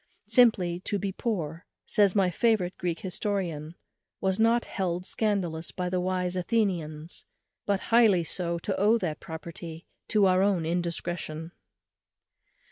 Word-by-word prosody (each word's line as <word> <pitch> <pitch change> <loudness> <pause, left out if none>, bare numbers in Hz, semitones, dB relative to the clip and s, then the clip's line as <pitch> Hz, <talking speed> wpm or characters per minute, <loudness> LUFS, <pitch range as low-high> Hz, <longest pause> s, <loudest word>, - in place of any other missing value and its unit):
Simply 195 -9 +4
to 205 +2 -2
be 195 0 -2
poor, 175 -7 -3 0.2
says 205 -2 +3
my 190 -3 +3
favourite 200 -3 +1
Greek 170 -2 -2
historian, 175 -5 -3 0.4
_was 190 0 0
not 230 +1 +3
held 180 -2 -2
scandalous 185 -7 -1
by 180 -1 -3
the 185 - +1
wise 180 0 -1
Athenians, 175 -6 -1 0.4
but 200 -1 +2
highly 215 -7 +6
so 170 +1 -2
to 190 +3 -2
owe 215 +4 +5
that 170 -8 -3
poverty 165 +1 -8 0.2
to 210 -2 +3
our 185 0 +4
own 195 -4 +2
indiscretion. 170 -1 -2
180 Hz, 130 wpm, -28 LUFS, 170-200 Hz, 0.4 s, highly